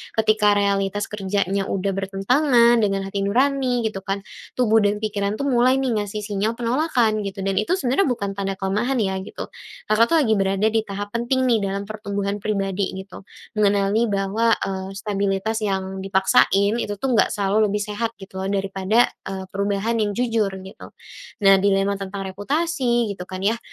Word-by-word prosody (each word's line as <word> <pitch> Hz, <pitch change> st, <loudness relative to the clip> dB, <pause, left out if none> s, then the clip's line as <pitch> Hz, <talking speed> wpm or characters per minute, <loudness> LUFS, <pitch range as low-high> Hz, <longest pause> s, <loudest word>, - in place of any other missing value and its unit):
ketika 215 Hz, -1 st, +3 dB
realitas 200 Hz, 0 st, 0 dB
kerjanya 195 Hz, -1 st, -1 dB
udah 195 Hz, 0 st, -1 dB
bertentangan 235 Hz, +6 st, +3 dB
dengan 195 Hz, -2 st, 0 dB
hati 195 Hz, +1 st, -4 dB
nurani 255 Hz, +1 st, +1 dB
gitu 215 Hz, -3 st, -2 dB
kan, 195 Hz, +1 st, -4 dB, 0.3 s
tubuh 225 Hz, -3 st, +3 dB
dan 205 Hz, -1 st, +2 dB
pikiran 205 Hz, -1 st, -1 dB
tuh 250 Hz, -, -4 dB
mulai 250 Hz, +1 st, +4 dB
nih 265 Hz, -2 st, 0 dB
ngasih 210 Hz, +1 st, -4 dB
sinyal 210 Hz, +2 st, -1 dB
penolakan 240 Hz, -2 st, +1 dB
gitu 195 Hz, 0 st, -6 dB
dan 195 Hz, 0 st, +1 dB
itu 215 Hz, -, +1 dB
sebenarnya 315 Hz, +2 st, +1 dB
bukan 200 Hz, -6 st, -2 dB
tanda 195 Hz, 0 st, -2 dB
kelemahan 205 Hz, +8 st, -1 dB
ya 190 Hz, -1 st, -1 dB
gitu, 190 Hz, -, -8 dB, 0.3 s
Kakak 230 Hz, +8 st, +3 dB
tuh -, -, +6 dB
lagi 225 Hz, -, +1 dB
berada 195 Hz, +1 st, 0 dB
di 225 Hz, -, +2 dB
tahap 205 Hz, +1 st, -5 dB
penting 240 Hz, +3 st, 0 dB
nih 240 Hz, -3 st, +3 dB
dalam 200 Hz, 0 st, -2 dB
pertumbuhan 205 Hz, -1 st, -4 dB
pribadi, 195 Hz, -2 st, -2 dB
gitu. 190 Hz, 0 st, -10 dB, 0.3 s
Mengenali 205 Hz, +2 st, +2 dB
bahwa, 205 Hz, +3 st, +1 dB
eee, 190 Hz, 0 st, -4 dB
stabilitas 200 Hz, +2 st, -1 dB
yang 190 Hz, -2 st, -2 dB
dipaksain 195 Hz, +2 st, +3 dB
itu 205 Hz, -3 st, -3 dB
tuh 260 Hz, +6 st, -2 dB
enggak 230 Hz, -, +2 dB
selalu 205 Hz, +2 st, +2 dB
lebih 205 Hz, +1 st, -1 dB
sehat 225 Hz, +2 st, -3 dB
gitu 190 Hz, -1 st, -10 dB
loh 190 Hz, -, -2 dB
daripada, 195 Hz, +3 st, +1 dB, 0.2 s
eee, 190 Hz, 0 st, -4 dB
perubahan 200 Hz, +3 st, -1 dB
yang 205 Hz, -2 st, 0 dB
jujur, 230 Hz, -4 st, 0 dB
gitu. 190 Hz, -, -11 dB, 0.6 s
Nah, 195 Hz, 0 st, +8 dB
dilema 200 Hz, 0 st, +1 dB
tentang 195 Hz, 0 st, -5 dB
reputasi 245 Hz, -, 0 dB
gitu 185 Hz, -2 st, -8 dB
kan 185 Hz, 0 st, -6 dB
ya, 225 Hz, +3 st, +1 dB
205 Hz, 170 wpm, -22 LUFS, 195-230 Hz, 0.6 s, Nah